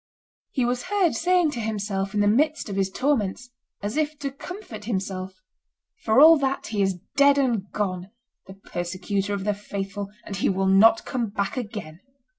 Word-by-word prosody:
He 255 Hz, -4 st, 0 dB
was 245 Hz, 0 st, -1 dB
heard 380 Hz, -3 st, +2 dB
saying 355 Hz, -2 st, +2 dB
to 245 Hz, -, -5 dB
himself 205 Hz, -3 st, -2 dB
in 205 Hz, -, +2 dB
the 205 Hz, -, +3 dB
midst 290 Hz, +4 st, +2 dB
of 200 Hz, -, -4 dB
his 195 Hz, -1 st, +1 dB
torments, 245 Hz, -1 st, -1 dB, 0.3 s
and 205 Hz, -, -1 dB
as 245 Hz, -, -5 dB
if 305 Hz, 0 st, 0 dB
to 280 Hz, -2 st, -4 dB
comfort 275 Hz, -, -9 dB
himself, 190 Hz, -3 st, -3 dB, 0.7 s
"For 220 Hz, +3 st, +3 dB
all 320 Hz, +2 st, +9 dB
that, 270 Hz, -1 st, -1 dB
he 210 Hz, -2 st, -2 dB
is 190 Hz, -2 st, +1 dB, 0.2 s
dead 280 Hz, 0 st, +5 dB
and 235 Hz, -8 st, 0 dB
gone, 185 Hz, -3 st, -3 dB, 0.4 s
the 190 Hz, -, -10 dB
persecutor 195 Hz, +2 st, -3 dB
of 195 Hz, -, -4 dB
the 210 Hz, +1 st, +1 dB
faithful, 200 Hz, 0 st, -5 dB, 0.2 s
and 200 Hz, -, -5 dB
he -, -, +1 dB
will 195 Hz, 0 st, 0 dB
not 200 Hz, +4 st, +5 dB
come 240 Hz, -3 st, -2 dB
back 200 Hz, -1 st, -2 dB
again." 210 Hz, -10 st, -6 dB
210 Hz, 185 wpm, -24 LUFS, 195-270 Hz, 0.7 s, all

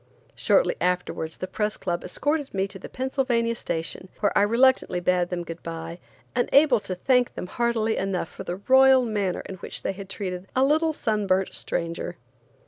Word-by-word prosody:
Shortly -, -, +3 dB
afterwards 180 Hz, -3 st, -1 dB
the -, -, -3 dB
Press 210 Hz, +2 st, -2 dB
Club 175 Hz, -2 st, -2 dB
escorted 290 Hz, -5 st, -2 dB
me 195 Hz, 0 st, +1 dB
to 190 Hz, -, -9 dB
the -, -, -9 dB
Pennsylvania 255 Hz, -3 st, 0 dB
Station, 175 Hz, -3 st, -4 dB
where 205 Hz, -, +1 dB
I -, -, +5 dB
reluctantly 235 Hz, -2 st, +3 dB
bade 175 Hz, 0 st, +1 dB
them 175 Hz, -1 st, -3 dB
good 165 Hz, 0 st, -8 dB
bye, 165 Hz, +1 st, -6 dB, 0.4 s
unable 255 Hz, +1 st, +4 dB
to 190 Hz, -2 st, -4 dB
thank 250 Hz, +6 st, +2 dB
them -, -, -4 dB
heartily 225 Hz, +1 st, 0 dB
enough 190 Hz, -3 st, -1 dB
for -, -, -9 dB
the 175 Hz, -1 st, -3 dB
royal 265 Hz, -1 st, +6 dB
manner 205 Hz, -5 st, -1 dB
in 190 Hz, -, -8 dB
which -, -, -6 dB
they -, -, -1 dB
had 195 Hz, 0 st, -9 dB
treated 185 Hz, -2 st, -5 dB
a 260 Hz, -, +4 dB
little 315 Hz, +3 st, +3 dB
sun 215 Hz, -8 st, -1 dB
burnt 185 Hz, 0 st, +1 dB
stranger. 170 Hz, +1 st, -3 dB
200 Hz, 180 wpm, -25 LUFS, 180-250 Hz, 0.4 s, royal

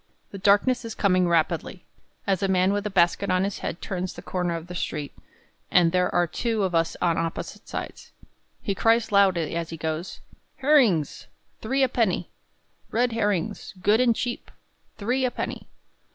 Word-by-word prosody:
The 195 Hz, -, -7 dB
darkness 210 Hz, +6 st, +3 dB
is 225 Hz, -1 st, -6 dB
coming 185 Hz, -3 st, +2 dB
rapidly, 170 Hz, +2 st, 0 dB, 0.4 s
as 195 Hz, -1 st, +1 dB
a 195 Hz, -, +2 dB
man 190 Hz, +1 st, +3 dB
with 205 Hz, +1 st, -1 dB
a -, -, -3 dB
basket 190 Hz, +1 st, +2 dB
on 185 Hz, 0 st, +2 dB
his 200 Hz, 0 st, -3 dB
head 170 Hz, -, -5 dB
turns 185 Hz, -1 st, -3 dB
the -, -, -10 dB
corner 180 Hz, -2 st, -2 dB
of 165 Hz, -1 st, -6 dB
the 180 Hz, -, -9 dB
street, 150 Hz, -4 st, -4 dB, 0.6 s
and 170 Hz, -2 st, +4 dB
there 180 Hz, 0 st, +2 dB
are 175 Hz, 0 st, +3 dB
two 220 Hz, +5 st, -1 dB
of 185 Hz, -2 st, -1 dB
us 165 Hz, -1 st, +1 dB
on 170 Hz, -2 st, +2 dB
opposite 165 Hz, 0 st, -5 dB
sides. -, -, -6 dB, 0.5 s
He 200 Hz, -, 0 dB
cries 225 Hz, +3 st, +2 dB
loudly 185 Hz, -6 st, +3 dB
as 170 Hz, -1 st, -3 dB
he 165 Hz, -, -6 dB
goes: 160 Hz, +3 st, -4 dB, 0.4 s
"Herrings! 260 Hz, -, +2 dB, 0.3 s
three 265 Hz, +5 st, +1 dB
a -, -, +5 dB
penny! 220 Hz, -8 st, 0 dB, 0.6 s
Red 245 Hz, +2 st, +1 dB
herrings, 205 Hz, -3 st, -2 dB
good 210 Hz, +5 st, +3 dB
and 240 Hz, -2 st, +3 dB
cheap, 240 Hz, +1 st, -4 dB, 0.5 s
three 245 Hz, +6 st, 0 dB
a 255 Hz, -, +3 dB
penny!" -, -, -5 dB
190 Hz, 175 wpm, -25 LUFS, 175-225 Hz, 0.6 s, a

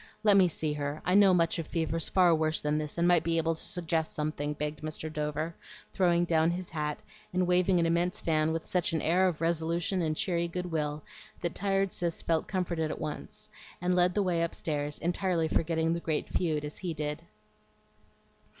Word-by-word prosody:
Let 210 Hz, -2 st, +6 dB
me 190 Hz, -2 st, +6 dB
see 155 Hz, -2 st, -2 dB
her; 145 Hz, +1 st, -3 dB
I 180 Hz, -, +2 dB
know 200 Hz, -1 st, +7 dB
much 170 Hz, -2 st, +2 dB
of 165 Hz, -, -4 dB
fevers 165 Hz, -1 st, -1 dB
far 180 Hz, -3 st, +5 dB
worse 155 Hz, 0 st, +1 dB
than 150 Hz, +1 st, 0 dB
this, 150 Hz, +1 st, -5 dB
and 170 Hz, +1 st, +3 dB
might 175 Hz, -2 st, +4 dB
be 165 Hz, 0 st, 0 dB
able 165 Hz, 0 st, +1 dB
to 160 Hz, -, -5 dB
suggest 165 Hz, -2 st, -2 dB
something," 150 Hz, -1 st, -2 dB
begged 150 Hz, 0 st, -4 dB
Mr. 155 Hz, 0 st, -5 dB
Dover, 155 Hz, +2 st, -2 dB, 0.4 s
throwing 175 Hz, -2 st, +3 dB
down 160 Hz, -1 st, +3 dB
his 175 Hz, +1 st, -4 dB
hat, 150 Hz, -2 st, -3 dB, 0.3 s
and 180 Hz, 0 st, +1 dB
waving 180 Hz, +1 st, +3 dB
an 165 Hz, -, +2 dB
immense 170 Hz, +2 st, +1 dB
fan 155 Hz, -1 st, +1 dB
with 165 Hz, 0 st, -3 dB
such 180 Hz, -2 st, 0 dB
an 160 Hz, -, 0 dB
air 180 Hz, +4 st, +3 dB
of 165 Hz, -4 st, -2 dB
resolution 170 Hz, +3 st, 0 dB
and 155 Hz, -2 st, -1 dB
cheery 170 Hz, -2 st, 0 dB
good 180 Hz, +1 st, -4 dB
will 150 Hz, -2 st, -2 dB, 0.4 s
that 170 Hz, -1 st, -2 dB
tired 195 Hz, -1 st, 0 dB
Cis 170 Hz, -2 st, -2 dB
felt 165 Hz, -1 st, 0 dB
comforted 170 Hz, -4 st, -1 dB
at -, -, -5 dB
once, 150 Hz, -, -6 dB, 0.3 s
and 180 Hz, +1 st, +1 dB
led 180 Hz, 0 st, +3 dB
the 205 Hz, -, +2 dB
way 175 Hz, -3 st, +1 dB
upstairs 150 Hz, -3 st, -2 dB
entirely 175 Hz, -1 st, 0 dB
forgetting 165 Hz, 0 st, +1 dB
the 170 Hz, -, -2 dB
great 160 Hz, -3 st, -2 dB
feud, 155 Hz, -4 st, -1 dB
as 150 Hz, -, -6 dB
he 175 Hz, -4 st, -4 dB
did. 150 Hz, +1 st, -3 dB
165 Hz, 200 wpm, -30 LUFS, 155-180 Hz, 0.4 s, know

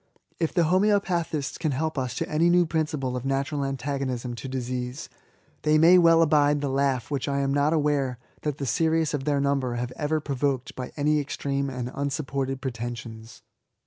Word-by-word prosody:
If 165 Hz, -2 st, 0 dB
the 175 Hz, -, +2 dB
HomoeopatfaistB 175 Hz, -4 st, +1 dB
can 155 Hz, -3 st, 0 dB
help 160 Hz, +4 st, -1 dB
us 130 Hz, -2 st, -2 dB
to -, -, -2 dB
any 160 Hz, +3 st, +2 dB
new 175 Hz, 0 st, +5 dB
principle 150 Hz, -5 st, -1 dB
of 125 Hz, -, -4 dB
natural 140 Hz, +2 st, -1 dB
anta* 135 Hz, 0 st, -2 dB
gonism 125 Hz, -2 st, -3 dB
to 125 Hz, +3 st, -7 dB
disease^ 125 Hz, 0 st, -4 dB, 0.5 s
they 155 Hz, 0 st, +3 dB
may 170 Hz, +4 st, +7 dB
well 165 Hz, -1 st, +6 dB
abide 145 Hz, -2 st, +3 dB
the 140 Hz, -1 st, -2 dB
laugh 135 Hz, -2 st, 0 dB
which 135 Hz, -3 st, -1 dB
I 140 Hz, -1 st, 0 dB
am 135 Hz, 0 st, 0 dB
not 145 Hz, +2 st, +2 dB
aware 145 Hz, -5 st, +1 dB, 0.2 s
that 150 Hz, -2 st, -2 dB
the 140 Hz, -, -3 dB
serious 160 Hz, +3 st, +1 dB
of 140 Hz, -2 st, -2 dB
their 145 Hz, -1 st, +1 dB
number 140 Hz, -3 st, 0 dB
have 120 Hz, +1 st, -3 dB
ever 155 Hz, +1 st, 0 dB
provoked 140 Hz, -3 st, -2 dB
by 125 Hz, -1 st, -6 dB
any 150 Hz, +1 st, +2 dB
extreme 140 Hz, -1 st, -2 dB
and 125 Hz, -1 st, -4 dB
unsupported 135 Hz, -2 st, -2 dB
pretensions. 120 Hz, -3 st, -6 dB
140 Hz, 180 wpm, -26 LUFS, 130-155 Hz, 0.5 s, may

